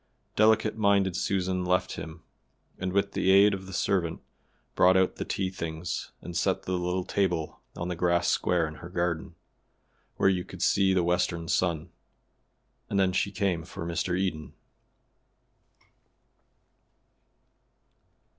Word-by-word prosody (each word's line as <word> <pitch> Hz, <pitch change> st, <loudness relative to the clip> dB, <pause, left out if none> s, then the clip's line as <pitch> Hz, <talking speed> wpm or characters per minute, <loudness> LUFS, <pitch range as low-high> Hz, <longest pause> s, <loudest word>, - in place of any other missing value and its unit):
Delicate 110 Hz, 0 st, +3 dB
minded 100 Hz, -4 st, +2 dB
Susan 95 Hz, -1 st, -1 dB
left 90 Hz, +1 st, +1 dB
him, 80 Hz, +1 st, -8 dB, 0.6 s
and 90 Hz, 0 st, -2 dB
with 100 Hz, +1 st, +1 dB
the -, -, 0 dB
aid 100 Hz, +2 st, +6 dB
of 95 Hz, -1 st, -6 dB
the -, -, -9 dB
servant 90 Hz, -3 st, 0 dB, 0.5 s
brought 95 Hz, +1 st, +5 dB
out 95 Hz, 0 st, +2 dB
the -, -, -4 dB
tea 95 Hz, -1 st, -2 dB
things 85 Hz, -1 st, -5 dB
and 85 Hz, -, -7 dB
set 95 Hz, +2 st, 0 dB
the -, -, -5 dB
little 90 Hz, 0 st, -1 dB
table 90 Hz, -5 st, -1 dB, 0.2 s
on 85 Hz, -, -4 dB
the 90 Hz, -, -3 dB
grass 85 Hz, 0 st, +1 dB
square 85 Hz, -3 st, +1 dB
in 80 Hz, -, -7 dB
her 85 Hz, -, -8 dB
garden, 85 Hz, -2 st, -2 dB, 0.8 s
where -, -, +2 dB
you 95 Hz, -2 st, +2 dB
could -, -, -7 dB
see 95 Hz, -1 st, +3 dB
the 90 Hz, -, +2 dB
western 85 Hz, -1 st, 0 dB
sun. 85 Hz, -1 st, 0 dB, 1.0 s
And 100 Hz, -, +1 dB
then 95 Hz, -1 st, +3 dB
she 95 Hz, +2 st, 0 dB
came 95 Hz, -4 st, -1 dB
for 85 Hz, -, -7 dB
Mr. 85 Hz, +1 st, -1 dB
Eden. 90 Hz, -5 st, -3 dB
90 Hz, 140 wpm, -28 LUFS, 85-95 Hz, 1.0 s, aid